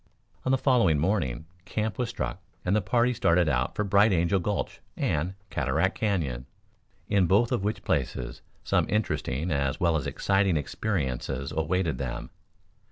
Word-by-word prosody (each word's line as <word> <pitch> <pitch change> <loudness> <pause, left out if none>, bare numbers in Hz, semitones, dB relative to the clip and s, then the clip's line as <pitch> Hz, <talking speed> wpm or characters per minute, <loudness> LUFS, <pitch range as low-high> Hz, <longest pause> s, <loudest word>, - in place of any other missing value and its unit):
On 130 - +2
the 135 - +4
following 125 - +3
morning 80 - 0 0.2
camp 110 +4 -2
was 120 -2 0
struck 120 - -4 0.2
and 90 +3 +2
the 105 - +3
party 120 +6 +2
started 85 -7 +3
out 65 -3 0
for 105 - 0
Bright 100 +2 +4
Angel 85 +1 +2
Gulch 100 +3 -3 0.2
and 85 +6 0 0.2
Cataract - - +1
Canyon, 75 - -1 0.6
in 95 -3 +3
both 110 +7 +3
of 120 -6 0
which 105 +2 -2
places - - -2 0.2
some - - +1
interesting 90 - -1
as 70 -2 0
well 85 -2 +2
as 75 - -1
exciting 95 -3 +2
experiences 70 - -2
awaited 80 +1 0
them. 65 -3 -4
90 Hz, 155 wpm, -27 LUFS, 75-105 Hz, 0.6 s, the